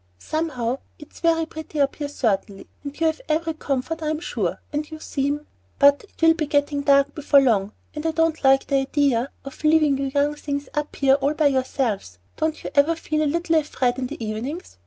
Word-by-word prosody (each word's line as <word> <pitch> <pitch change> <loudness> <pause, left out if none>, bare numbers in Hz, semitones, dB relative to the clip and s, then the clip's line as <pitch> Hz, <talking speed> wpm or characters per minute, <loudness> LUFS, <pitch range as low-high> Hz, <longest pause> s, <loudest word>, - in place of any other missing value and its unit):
Somehow 260 - -2 0.2
it's 295 - -14
very 330 -1 +2
pretty 315 -1 -7
up 280 -1 +1
here 290 - -3
certainly, 205 -7 -2 0.2
and 285 +1 -7
you 330 - +2
have 320 0 0
every 325 +1 0
comfort 310 +2 -3
I'm 310 0 -1
sure, - - -2
and 300 +1 -2
you 315 - -7
seem 285 0 -2 0.3
But 285 +7 +5
it - - -31
will 325 0 +7
be 320 -2 -2
getting 285 0 +1
dark 280 0 +4
before 295 -2 +4
long, 215 -6 +2 0.2
and 300 - -5
I - - +1
don't 325 0 0
like 270 0 +5
the 275 - +1
idea 270 -2 +1 0.2
of 275 - -10
leaving 305 -3 +4
you 275 - -1
young 285 +2 +1
things 285 -1 -4
up 300 0 -3
here 270 -1 +4
all 280 +2 +1
by 310 - +1
yourselves. 255 - -1 0.2
Don't 315 0 -2
you - - -5
ever 295 +4 +4
feel 310 -1 -2
a 300 - +2
little 335 +1 +1
afraid 260 -5 0
in 255 - -2
the 230 - -6
evenings? 225 - -5
285 Hz, 205 wpm, -23 LUFS, 270-315 Hz, 0.3 s, will